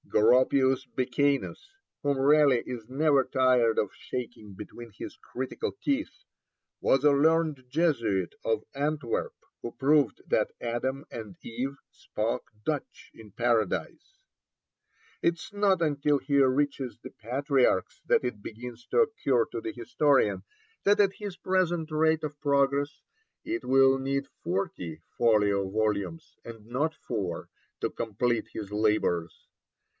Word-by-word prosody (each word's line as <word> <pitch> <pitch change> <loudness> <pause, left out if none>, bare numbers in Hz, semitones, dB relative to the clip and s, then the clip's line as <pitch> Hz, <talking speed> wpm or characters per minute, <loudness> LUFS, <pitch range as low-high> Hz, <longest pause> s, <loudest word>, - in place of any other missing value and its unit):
Goropius 130 +3 +4
Becanus, 140 - 0 0.3
whom 140 -1 +1
Raleigh 140 -2 +4
is 120 -3 -7
never 140 0 +3
tired 125 -4 +3
of 105 - -1
shaking 120 -5 -6
between 115 +3 -10
his - - -7
critical 130 - -5
teeth, 285 +2 -2 0.6
was 135 +2 +3
a 145 - +7
learned 155 -1 +2
Jesuit 115 - +1
of 110 -1 0
Antwerp, 145 -3 -2 0.3
who 120 - -5
proved 140 -1 +2
that - - +1
Adam 130 +4 -2
and 110 -5 -8
Eve 130 +4 -4
spoke 110 +2 -3 0.2
Dutch 150 -3 -4
in 110 -2 -14
Paradise. 115 - -1 1.0
It 170 - +2
is 170 +5 -11
not 200 -3 +2
until 145 -2 +2
he 140 0 +2
reaches 135 -1 +1
the - - -10
Patriarchs 130 - 0
that - - +3
it 110 -4 -4
begins 120 +2 -9
to - - +3
occur 140 - +2
to 115 - -4
the 110 - -4
historian 120 0 +1 0.4
that 205 +1 +4
at 200 -1 +4
his 200 -3 -7
present 175 -3 0
rate 160 0 +2
of 150 -1 -5
progress 140 0 +1 0.4
it 345 +2 -3
will 135 0 +5
need 135 +1 -2 0.2
forty 175 - -3 0.2
folio 105 -4 +3
volumes, 110 +9 -2
and 115 -2 -10
not 145 +7 -1
four, 95 -8 -4 0.3
to - - -1
complete 115 +1 -1
his 105 -2 -7
labours. 105 -6 0
130 Hz, 130 wpm, -28 LUFS, 115-150 Hz, 1.0 s, a